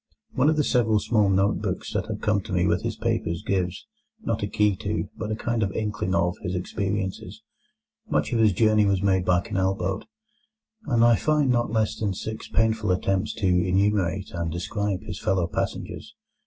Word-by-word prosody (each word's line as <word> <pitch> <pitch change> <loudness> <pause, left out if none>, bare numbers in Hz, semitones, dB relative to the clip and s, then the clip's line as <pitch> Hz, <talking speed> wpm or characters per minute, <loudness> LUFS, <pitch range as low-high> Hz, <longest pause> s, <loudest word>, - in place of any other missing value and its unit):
One 135 +3 +3
of 155 -1 +2
several 115 -4 +3
small 105 -2 +2
note 95 +1 +2
books - - -3
that - - -1
have - - -5
come 105 -1 +1
to 100 - -10
me 90 -1 +2
with 85 0 +1
his - - -3
papers 85 +1 -2
gives, 90 -2 -1 0.4
not 115 - -1
a 105 - -1
key 105 -1 +2
to, 105 +3 -2
but 105 - -5
a 110 - -1
kind 115 +1 -2
of 100 -2 0
inkling 105 -3 -2
of, 85 +1 +1
his 90 +1 -3
experiences. 95 - -3 0.7
Much - - 0
of 115 - +1
his 110 -2 +5
journey 110 +1 +3
was 100 -1 +1
made 95 -2 +2
by 90 -1 +3
canal 95 +1 0
boat, 95 +1 -3 0.8
and 120 -4 +4
I 120 -1 +6
find 150 0 +2
not 120 -1 +1
less 110 -1 +1
than 100 -3 -1
six 110 +3 -6
painful 110 -2 +1
attempts 95 +3 0
to 100 - -3
enumerate 95 +1 +1
and 85 -2 -3
describe 100 +3 -2
his - - -6
fellow 95 -2 +1
passengers. 85 - -4
100 Hz, 190 wpm, -25 LUFS, 95-110 Hz, 0.8 s, I